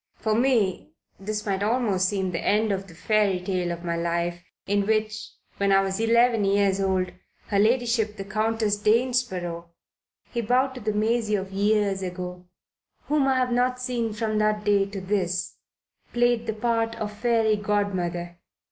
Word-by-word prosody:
For 220 - -1
me 230 -5 +1 0.3
this 210 +2 -4
might 195 -2 -1
almost 205 -4 +1
seem 190 -3 -1
the 165 - -3
end 215 +1 +2
of 195 0 -3
the 165 - -14
fairy 205 0 +1
tale 180 -1 -2
of 170 0 -6
my 170 -1 -1
life, 170 +1 -2 0.2
in 205 0 0
which 215 0 -1 0.2
when 200 0 +1
I 195 0 +5
was 195 +1 -2
eleven 230 0 +3
years 195 0 +2
old 185 -1 0 0.4
her 200 - +2
ladyship 225 -1 +2
the 195 - -4
Countess 215 0 0
of - - -20
Danesborough" 210 -8 0 0.6
(he 235 - -1
bowed 255 +4 +2
to 255 - -9
the 215 0 -1
Maisie 220 0 +1
of 190 -1 -4
years 200 0 +1
ago), 180 -1 -6 0.6
"whom 295 -2 +2
I 265 - +3
have 255 -1 +1
not 250 +1 +1
seen 245 -3 -2
from 215 0 -1
that 215 0 +1
day 200 -1 +3
to 200 0 -6
this, 185 -2 -2 0.6
played 240 -1 +2
the 220 - 0
part 225 +1 0
of 210 -2 -4
Fairy 225 0 +2
Godmother. 185 -4 -2
210 Hz, 170 wpm, -25 LUFS, 190-225 Hz, 0.6 s, I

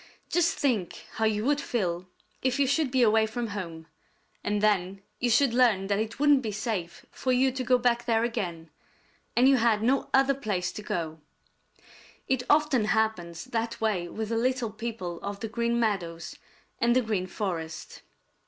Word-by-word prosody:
Just 345 -1 +2
think 245 - -1
how 225 - +1
you 215 0 0
would 290 +1 +2
feel 180 -8 -2 0.3
if 260 +1 +1
you 280 - +4
should 285 +2 +1
be 255 -1 +3
away 220 0 +4
from 230 +1 -4
home, 170 -5 -6 0.6
and 205 0 0
then 195 -2 +1 0.2
you 245 - +1
should 240 +2 +4
learn 235 -6 +3
that 200 +1 0
it 220 +3 -3
wouldn't 290 -2 +5
be 220 -4 -3
safe 205 -5 -4
for 255 - -2
you 260 +1 +3
to 255 0 -3
go 250 0 +4
back 240 -1 +1
there 230 -1 +2
again, 175 -9 -3 0.7
and 250 +2 +6
you 270 -1 +6
had 225 -2 +2
no 265 +4 +1
other 270 +1 +4
place 205 -9 -2
to - - -7
go. 165 -6 -4 1.1
It 260 -2 +1
often 295 -6 +3
happens 215 -6 -1
that 230 -2 -3
way 205 -6 0
with 220 +4 -5
the 230 - 0
little 250 -1 0
people 215 -6 -5
of 200 0 -5
the 225 - -4
Green 235 +1 0
Meadows 175 -7 -2 0.4
and 235 +1 +3
the 255 - +3
Green 205 -5 -1
Forest. 175 -4 -5
225 Hz, 180 wpm, -27 LUFS, 195-250 Hz, 1.1 s, and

